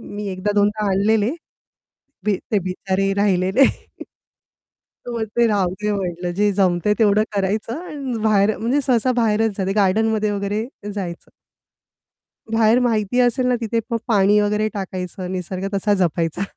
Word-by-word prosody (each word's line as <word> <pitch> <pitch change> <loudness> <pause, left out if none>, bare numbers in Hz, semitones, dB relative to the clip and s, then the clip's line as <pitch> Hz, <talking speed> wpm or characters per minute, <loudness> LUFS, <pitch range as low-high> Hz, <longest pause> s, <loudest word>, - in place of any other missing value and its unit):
मी 205 -1 -4
एकदा 190 +2 -2
दोनदा 210 +1 +2
आणलेले 210 +4 +2 0.9
बी 205 -3 +2
ते 205 - +3
बिचारे 190 +1 -1
राहिले 190 -2 +1
नाही 275 0 +7 1.5
मग 230 -2 -2
ते 235 -1 +4
राहूदे 205 +1 0
म्हटलं, 180 -3 -3
जे 205 +2 +1
जमतंय 190 +1 +2
तेवढं 210 -1 +4
करायचं 215 - -1
आणि 270 -7 -4
बाहेर 210 0 +3
म्हणजे 245 +6 +1
सहसा 255 -1 +2
बाहेरच 225 -3 +1
जाते 190 0 0
गार्डनमध्ये 215 +2 +2
वगैरे 205 +2 -2 0.3
जायचं. 175 -4 -6 1.2
बाहेर 225 +1 +4
माहिती 230 0 +1
असेल 250 +1 +2
ना 250 - +2
तिथे 230 0 -1
मग 230 - +1
पाणी 205 -1 +4
वगैरे 210 +1 +1
टाकायचं 185 -1 -5
निसर्ग 185 +1 -4
तसा 205 +1 +1
जपायचा. 165 +2 -1
205 Hz, 140 wpm, -21 LUFS, 190-220 Hz, 1.5 s, नाही